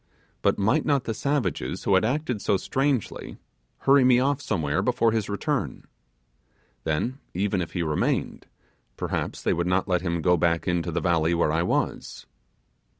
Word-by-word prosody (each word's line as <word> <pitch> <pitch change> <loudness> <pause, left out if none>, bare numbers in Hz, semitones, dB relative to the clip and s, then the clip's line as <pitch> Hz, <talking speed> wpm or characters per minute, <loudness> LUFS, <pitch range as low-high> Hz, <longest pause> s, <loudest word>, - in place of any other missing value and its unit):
But - - +2
might 110 +10 +2
not 140 -4 +1
the 115 - -3
savages 110 - -2
who 100 - +2
had 95 - +4
acted 125 -2 -1
so 100 - +2
strangely, 135 +2 -2 0.4
hurry 135 0 +5
me 125 -1 +5
off 140 +2 +1
somewhere 80 - -1
before 125 -2 +2
his 110 -2 -1
return? 100 -1 -2 1.0
Then, 80 - -1 0.2
even 95 0 0
if 85 - -5
he 85 - -1
remained, 75 -2 -1 0.5
perhaps - - -3
they - - +2
would 85 +1 -1
not 90 +2 +1
let 90 -2 +1
him 85 -3 -2
go 90 -1 +4
back 85 +1 +1
into 90 -1 0
the 85 - -1
valley 85 -1 +2
where 85 -2 +2
I 80 +2 +1
was. 85 - -2
95 Hz, 165 wpm, -25 LUFS, 85-125 Hz, 1.0 s, hurry